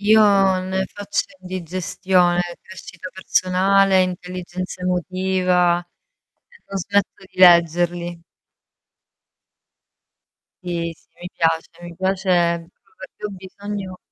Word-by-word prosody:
Io 205 -3 +5
ne 190 +1 -2
faccio 205 +1 -3 0.2
indigestione, 180 0 0 0.2
crescita 185 -1 -10
personale, 190 +1 +3
intelligenza 180 0 -5
emotiva 180 -1 +1 0.7
e 475 -1 -22
non 195 - -5
smetto 200 +1 -1
di - - -24
leggerli. 175 -1 +4 2.4
Sì, 170 -1 -3
sì, - - -31
mi 180 - -7
piace, 165 -1 +1
mi 175 -1 -9
piace 190 +1 -1 0.3
proprio 165 - -15 0.3
perchè - - -12
ho - - -1
bisogno 195 0 -7
185 Hz, 100 wpm, -21 LUFS, 175-190 Hz, 2.4 s, Io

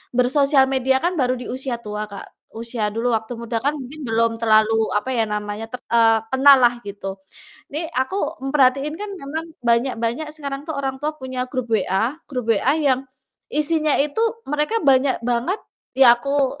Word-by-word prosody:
bersosial 270 +2 +4
media 265 0 +2
kan 355 +1 +1
baru 255 -1 +2
di 245 - -8
usia 260 -1 -3
tua, 210 0 -4
Kak, 200 -1 -13
usia 230 -1 -2
dulu 240 +2 0
waktu 220 +2 -4
muda 230 0 -3
kan 285 +4 0
mungkin 285 +2 -8
belum 230 +1 +2
terlalu, 220 -1 +3
apa 210 +5 -1
ya 235 -3 +1
namanya, 210 +1 -4
te 250 - -4
eee, 225 -1 +5
kenal 275 +1 +7
lah 240 0 +5
gitu 195 -1 -7 0.5
nih 320 +3 -3
aku 260 +10 -1
memperhatiin 275 +1 +2
kan 420 - -4
memang 315 +2 -5 0.2
banyak-banyak 235 +4 0
sekarang 280 -2 -5
tuh 315 - -2
orang 270 -1 -3
tua 305 +1 -3
punya 255 -2 -4
grup 255 -3 -4
WA 220 - 0
grup 250 -5 0
WA 250 +6 +2
yang 275 -4 +2 0.5
isinya 305 0 +2
itu 295 +9 0 0.2
mereka 300 +9 -1
banyak 265 -1 +4
banget 245 - 0 0.4
ya 255 -3 +8
aku 275 +2 -1
255 Hz, 170 wpm, -21 LUFS, 230-280 Hz, 0.5 s, ya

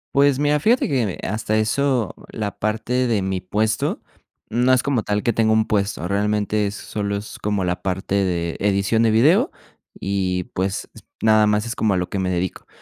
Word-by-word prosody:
Pues 140 -1 +4
mira, 145 0 +2
fíjate 235 - +3
que, 130 -5 +1
mm, - - -2
eh, - - -5
hasta 110 +1 -1
eso 120 +1 +1 0.2
la 105 -3 -4
parte 115 +4 0
de 110 -5 +1
mi 95 -1 -2
puesto 105 +4 -1 0.5
no 125 +3 +3
es 130 0 +4
como 135 -5 +1
tal 105 0 -1
que 120 - +1
tengo 110 0 +2
un 110 0 +3
puesto. 100 -5 -1
Realmente 105 +1 0
solo 100 0 -4
es 105 - -8
como 105 -2 -1
la 90 0 -2
parte 95 0 -3
de 85 -2 -1
edición 100 +3 +1
de 115 - +4
video 160 - +4 0.5
y, 95 -2 -1
pues, 95 +1 -2 0.4
nada 110 -1 +5
más 105 +1 +1
es 115 - -4
como 105 -3 +1
a - - +1
lo 90 0 -2
que 100 - -2
me 95 -1 0
dedico. 90 0 -3
105 Hz, 195 wpm, -21 LUFS, 95-115 Hz, 0.5 s, nada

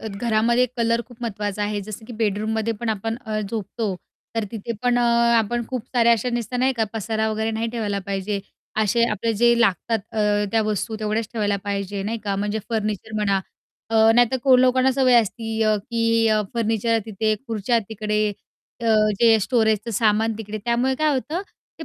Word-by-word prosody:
अ, 220 - -5
घरामध्ये 230 +3 +1
कलर 230 0 +1
खूप 245 -2 -15
महत्त्वाचा 210 -2 -3
आहे, 205 0 -1
जसं 215 +2 -8
की 245 - -8
बेडरूममध्ये 220 +1 -1
पण 235 - -3
आपण 225 +1 -2
अ, 215 -1 -2
झोपतो, 210 0 -3 0.4
तर 225 -1 0
तिथे 225 +1 -4
पण 245 -1 +2
अ, - - +2 0.4
आपण 235 +2 0
खूप 255 -3 -4
साऱ्या 235 -1 +5
अशा 235 +2 0
नुसतं 240 +1 -2
नाही 260 +2 +3
का 220 - +3
पसारा 220 0 -1
वगैरे 220 +1 -1
नाही 225 +1 -2
ठेवायला 215 -4 -2
पाहिजे. 200 +1 -2 0.4
असे 230 +3 +2
आपले 230 +4 -1
जे 235 +3 +4
लागतात 225 +1 +2
अ, 220 - -3 0.3
त्या 225 -1 +3
वस्तू 215 +1 -2
तेवढ्याच 215 +1 -1
ठेवायला 205 -3 0
पाहिजे 200 -1 -3
नाही 225 +3 -3
का, 200 -1 -1
म्हणजे 205 +2 -1
फर्निचर 215 -2 -3
म्हणा 200 -2 +1 0.5
अ, 220 0 +5
नाहीतर 245 +1 +4
कोण 255 -2 +6
लोकांना 255 +1 +4
सवय 260 -1 +3
असती, 225 +1 -3
अ, 215 -1 +3
की 230 +1 +1
अ, 215 -1 +3
फर्निचर 225 0 +1
तिथे, 215 0 0
खुर्च्या 225 +1 0
तिकडे, 215 -1 -1 0.5
अ, 230 - -3 0.3
जे 225 -2 +6
स्टोरेजचं 220 0 +1
सामान 220 +1 +2
तिकडे, 215 -1 -5
त्यामुळे 245 +2 +1
काय 310 +2 +1
होतं 310 +7 -2 0.4
ते - - -5
220 Hz, 180 wpm, -22 LUFS, 210-235 Hz, 0.5 s, कोण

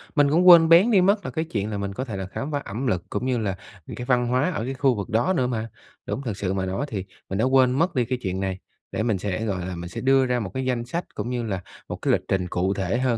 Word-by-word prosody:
mình 145 -2 +4
cũng 175 +5 +3
quên 165 -2 +9
béng 180 +8 +7
đi 195 -4 +5
mất 200 +1 +2
là - - -3
cái 160 0 -2
chuyện 105 -8 -3
là 105 - -2
mình 100 -1 -3
có 130 +7 -4
thể 110 -6 -5
là 95 - -4
khám 135 +10 -5
phá 145 - 0
ẩm 120 +7 -4
lực, 90 -6 0
cũng 105 +5 -3
như 130 -2 +1
là 100 -4 -1 0.3
những - - -8
cái 125 - -5
văn 125 -1 +2
hóa 130 +8 +1
ở 150 - -3
cái 135 - -3
khu 130 -2 +2
vực 100 -2 -5
đó 120 +12 +2
nữa 130 -6 +1
mà. 115 -2 -2 0.4
Đúng - - -3
thật 110 -7 -4
sự 95 -1 -1
mà 95 -1 -1
nói 95 +10 -2
thì 95 -6 -4 0.2
mình 95 - -2
đã 115 - +3
quên 130 -1 +4
mất 160 +5 +1
đi 125 - +2
cái 130 +2 -2
chuyện 95 -1 -2
này, 95 -1 -2 0.3
để 110 - -1
mình 110 -4 +1
sẽ, 100 +3 -3
gọi 95 -4 -2
là, 90 0 -4
mình 85 0 -7
sẽ - - -6
đưa 135 0 +4
ra 125 -1 0
một 100 -5 -4
cái 130 0 -2
danh 120 -2 -1
sách 170 +8 -3
cũng 120 - -3
như 125 -1 -2
là 95 -5 -3 0.3
một - - -3
cái - - +1
lịch - - +2
trình 95 -2 0
cụ 95 +3 0
thể 95 +3 -1
hơn, 125 -2 +1
120 Hz, 315 wpm, -24 LUFS, 95-135 Hz, 0.4 s, quên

